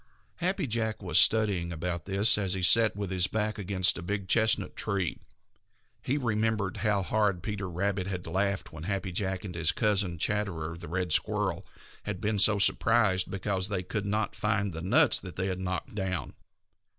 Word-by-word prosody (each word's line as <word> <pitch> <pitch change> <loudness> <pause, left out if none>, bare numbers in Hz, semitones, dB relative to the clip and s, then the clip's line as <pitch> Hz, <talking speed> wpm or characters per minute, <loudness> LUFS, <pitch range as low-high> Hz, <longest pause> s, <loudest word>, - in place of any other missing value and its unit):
Happy 185 0 -1
Jack 110 -3 -2
was 90 -2 +3
studying 100 -6 +3
about 85 +1 -4
this 100 +3 +3
as 95 -2 0
he 95 - -3
sat 110 +3 +5
with 100 -2 -4
his 95 -1 +2
back 110 +1 -2
against 95 -2 +3
a - - -6
big 100 +1 -4
chestnut 110 +2 +2
tree. 100 -6 -2 0.8
He 140 - -1
remembered 110 -5 -1
how 105 -3 0
hard 100 -2 0
Peter 100 -3 -4
Rabbit 95 +2 -2
had 90 -2 -5
laughed 100 -2 -2
when 80 +1 -8
Happy 100 -1 -2
Jack 95 +1 -3
and 90 - -6
his 85 -2 +1
cousin, 100 -5 0
Chatterer 85 -4 -2
the 85 - -10
Red 90 0 -2
Squirrel, - - -1 0.3
had 100 -3 -5
been 105 0 -1
so 105 +1 +5
surprised 100 -1 +2
because 95 -1 -1
they 100 -3 -2
could 100 +2 -4
not 105 +1 -1
find 105 -3 -1
the 80 - -5
nuts 125 - +5
they 95 0 -5
had 95 -1 -3
knocked 90 0 -4
down. 95 -3 -3
100 Hz, 175 wpm, -28 LUFS, 90-105 Hz, 0.8 s, sat